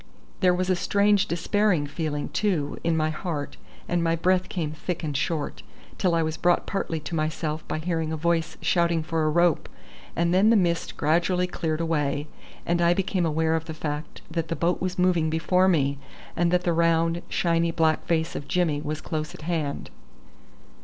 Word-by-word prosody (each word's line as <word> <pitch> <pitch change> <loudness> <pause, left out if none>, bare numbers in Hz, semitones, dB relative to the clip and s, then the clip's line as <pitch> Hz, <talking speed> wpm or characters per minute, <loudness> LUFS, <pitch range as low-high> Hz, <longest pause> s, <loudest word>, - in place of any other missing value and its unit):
There 180 -2 +4
was 185 +1 0
a - - +3
strange 200 +2 +2
despairing 175 -1 +1
feeling, 145 0 -3
too, 175 -9 -1
in 165 -1 +1
my 155 0 +1
heart, 155 -3 -4 0.3
and 175 -1 0
my 165 0 +2
breath 185 +2 +1
came 160 -5 -2
thick 160 +3 -4
and 150 -2 -3
short, 155 +2 -2 0.4
till 180 -3 +2
I 165 - +2
was 160 0 -2
brought 175 0 +2
partly 170 -5 -2
to 155 +3 -7
myself 155 0 -2
by - - -2
hearing 160 -1 -2
a 160 - -2
voice 165 0 0
shouting 170 -2 +2
for 160 0 -1
a - - +3
rope, 170 0 +2 0.5
and 170 +1 +1
then 195 +4 +5
the 230 - +5
mist 170 -4 0
gradually 175 +4 +2
cleared 160 -3 -2
away, 150 -3 0 0.4
and 170 0 +1
I 170 0 +4
became 185 -2 0
aware 160 +1 +1
of 160 0 -2
the 160 -1 -6
fact 150 0 -5
that 165 -1 -2
the 165 - -2
boat 175 +1 0
was 185 +1 -2
moving 180 -3 +2
before 180 +4 +2
me, 140 -6 +2 0.4
and 175 0 +2
that 180 +1 +2
the 175 - +1
round, 165 0 +2
shiny 170 -1 +1
black 160 -1 +1
face 165 -1 0
of 140 - -5
Jimmy 160 -3 +1
was 155 +1 -4
close 155 -1 -4
at - - -11
hand. 155 -4 -3
165 Hz, 190 wpm, -25 LUFS, 155-175 Hz, 0.5 s, then